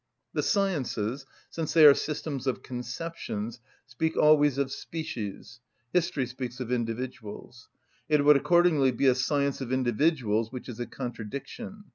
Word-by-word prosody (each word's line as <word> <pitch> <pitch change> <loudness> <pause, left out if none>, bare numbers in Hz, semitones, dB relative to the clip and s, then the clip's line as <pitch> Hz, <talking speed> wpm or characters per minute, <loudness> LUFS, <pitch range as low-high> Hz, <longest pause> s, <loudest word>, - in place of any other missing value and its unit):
The - - 0
sciences, 135 - -1 0.2
since 165 -1 -3
they 160 -2 +8
are 145 - +11
systems 140 -2 -4
of 130 - -1
conceptions, 125 -3 -5 0.3
speak 130 +6 -2
always 150 -2 +5
of 140 -1 0
species; 135 -7 -6 0.3
history 175 -6 +1
speaks 125 0 -6
of 125 -2 -4
individuals. 120 -1 -5 0.4
It 150 -2 +3
would 150 0 +8
accordingly 165 -2 +4
be 125 +3 -1
a 130 - +6
science 140 +2 0
of 130 -1 -4
individuals, 120 -3 +1
which 125 -1 -7
is 120 -2 -8
a 120 - -3
contradiction. 140 - -7
130 Hz, 140 wpm, -28 LUFS, 120-155 Hz, 0.4 s, are